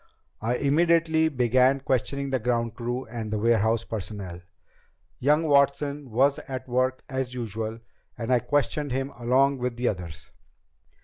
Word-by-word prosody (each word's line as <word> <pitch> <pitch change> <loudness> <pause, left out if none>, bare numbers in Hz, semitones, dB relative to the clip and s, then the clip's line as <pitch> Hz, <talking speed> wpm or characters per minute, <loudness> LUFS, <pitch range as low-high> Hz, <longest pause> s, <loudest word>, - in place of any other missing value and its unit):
I 115 +3 0
immediately 160 +2 +3
began 130 0 +3
questioning 140 +1 -1
the 130 - +1
ground 115 0 0
crew 120 +2 -4
and 110 -2 -6
warehouse 115 0 +2
personnel. 100 -5 -6 0.8
Young 150 +5 +3
Watson 140 -1 +2
was 135 +6 +2
at 130 -1 -5
work 130 +1 0
as 130 -2 -3
usual 110 -1 -4 0.4
and 115 +2 -1
I 125 - +5
questioned 145 +1 0
him 135 +2 -2
along 130 +3 +2
with 125 -1 -2
the 120 +1 -1
others. 85 -5 -7
125 Hz, 135 wpm, -26 LUFS, 115-140 Hz, 0.8 s, I